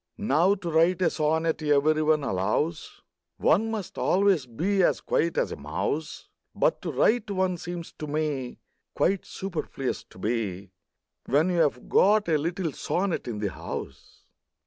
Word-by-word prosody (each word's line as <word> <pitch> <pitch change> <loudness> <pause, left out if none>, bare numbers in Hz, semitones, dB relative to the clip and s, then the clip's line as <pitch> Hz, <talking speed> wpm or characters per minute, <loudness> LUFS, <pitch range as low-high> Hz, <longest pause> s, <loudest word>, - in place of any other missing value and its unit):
Now, 190 -2 +3
to 180 -4 -5
write 165 +3 +3
a - - +3
sonnet, 160 +1 0
every 150 +1 +3
one 155 -1 +2
allows, 110 - -2 0.3
One 220 +7 +3
must 215 -5 -5
always 190 -7 +2
be 190 - 0
as - - +3
quiet 170 +1 0
as - - +1
a - - -3
mouse; 80 - -4 0.3
But - - +1
to - - -3
write 225 -1 +2
one 185 -2 0
seems 175 0 -6
to 155 - -4
me 145 -4 -2 0.4
Quite 195 +1 +1
superfluous 160 -8 -4
to - - -18
be, 100 -3 -3 0.6
When 150 +7 +3
you 165 -4 +4
've 125 - -18
got 205 0 +4
a 155 -2 +3
little 170 +2 -2
sonnet 180 +4 -2
in 115 -3 -3
the 105 -2 -2
house. 70 +1 -8
160 Hz, 155 wpm, -26 LUFS, 140-185 Hz, 0.6 s, you